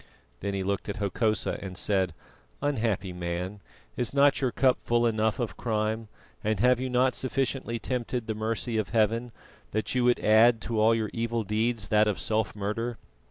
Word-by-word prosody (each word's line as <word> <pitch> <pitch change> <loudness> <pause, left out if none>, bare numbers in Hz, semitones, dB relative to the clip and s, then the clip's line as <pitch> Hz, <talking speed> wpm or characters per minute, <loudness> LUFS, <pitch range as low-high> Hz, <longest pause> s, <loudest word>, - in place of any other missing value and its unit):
Then 100 0 -3
he 95 - -1
looked 100 +2 -2
at 105 - -2
Hokosa 110 +1 0
and 95 -2 -7
said: 95 -5 +1 0.4
"Unhappy 110 -9 -1
man, 90 +3 -4 0.4
is 125 +2 -2
not 140 0 +4
your 130 -2 +1
cup 130 +1 +3
full 120 0 +1
enough 110 -1 +1
of 120 -4 -3
crime, 110 0 -1 0.4
and 110 -2 0
have 125 +2 +4
you 130 0 -2
not 125 +1 +3
sufficiently 130 -2 -1
tempted 125 0 -3
the 110 - -2
mercy 110 +2 -2
of 105 - -2
Heaven, 115 +2 +1 0.4
that 110 +1 -1
you 125 -1 +2
would 125 0 +4
add 110 +2 +5
to 115 -2 -2
all 110 +1 +5
your 110 -2 -2
evil 115 0 -1
deeds 110 +1 -1
that 105 0 +4
of 105 - 0
self 110 -1 0
murder?" 110 +3 -3
110 Hz, 180 wpm, -28 LUFS, 105-120 Hz, 0.4 s, add